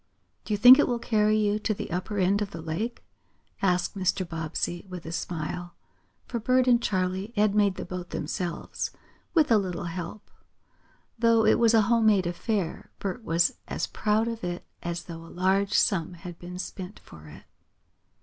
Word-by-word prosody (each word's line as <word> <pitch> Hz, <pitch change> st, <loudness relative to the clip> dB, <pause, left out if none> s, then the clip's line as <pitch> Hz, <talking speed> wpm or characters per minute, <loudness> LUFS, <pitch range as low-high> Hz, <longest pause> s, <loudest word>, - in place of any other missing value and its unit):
"Do 215 Hz, -, -2 dB
you -, -, -2 dB
think 245 Hz, +6 st, +10 dB
it -, -, +4 dB
will 245 Hz, -, 0 dB
carry 215 Hz, -2 st, +2 dB
you 210 Hz, 0 st, +1 dB
to 215 Hz, 0 st, -1 dB
the 210 Hz, -3 st, -6 dB
upper 185 Hz, +4 st, -3 dB
end 195 Hz, +2 st, +2 dB
of 205 Hz, -, -1 dB
the 170 Hz, -, -8 dB
lake?" 210 Hz, +10 st, -3 dB, 0.6 s
asked 180 Hz, 0 st, +1 dB
Mr. 185 Hz, -1 st, 0 dB
Bobbsey 165 Hz, +1 st, -3 dB
with 180 Hz, -2 st, -8 dB
a 165 Hz, -, -5 dB
smile, 175 Hz, +1 st, -4 dB, 0.5 s
for 235 Hz, -, -3 dB
Bert 255 Hz, +3 st, +2 dB
and 240 Hz, -1 st, +5 dB
Charley 190 Hz, +1 st, -1 dB
had 210 Hz, -1 st, +3 dB
made 205 Hz, -2 st, +3 dB
the -, -, -6 dB
boat 180 Hz, -1 st, -6 dB
themselves, 170 Hz, +3 st, -3 dB, 0.5 s
with 310 Hz, -6 st, +4 dB
a 220 Hz, -, +6 dB
little 180 Hz, -3 st, -3 dB
help. 175 Hz, +4 st, -6 dB, 0.9 s
Though 230 Hz, -1 st, +4 dB
it 220 Hz, -, +4 dB
was 230 Hz, -1 st, +5 dB
a 220 Hz, -, +6 dB
home 230 Hz, +1 st, +3 dB
made 200 Hz, -4 st, +4 dB
affair, 175 Hz, 0 st, -2 dB
Bert 200 Hz, +4 st, -4 dB
was 170 Hz, -3 st, +2 dB
as -, -, -2 dB
proud 215 Hz, +1 st, 0 dB
of 230 Hz, -3 st, -4 dB
it 175 Hz, 0 st, -4 dB, 0.2 s
as 170 Hz, 0 st, -4 dB
though 165 Hz, -1 st, -9 dB
a -, -, -12 dB
large 195 Hz, +2 st, +2 dB
sum 180 Hz, -3 st, +2 dB
had 175 Hz, 0 st, -9 dB
been 180 Hz, +1 st, -8 dB
spent 185 Hz, +1 st, -7 dB
for 75 Hz, -1 st, -14 dB
it. 75 Hz, -, -12 dB
195 Hz, 185 wpm, -27 LUFS, 175-215 Hz, 0.9 s, think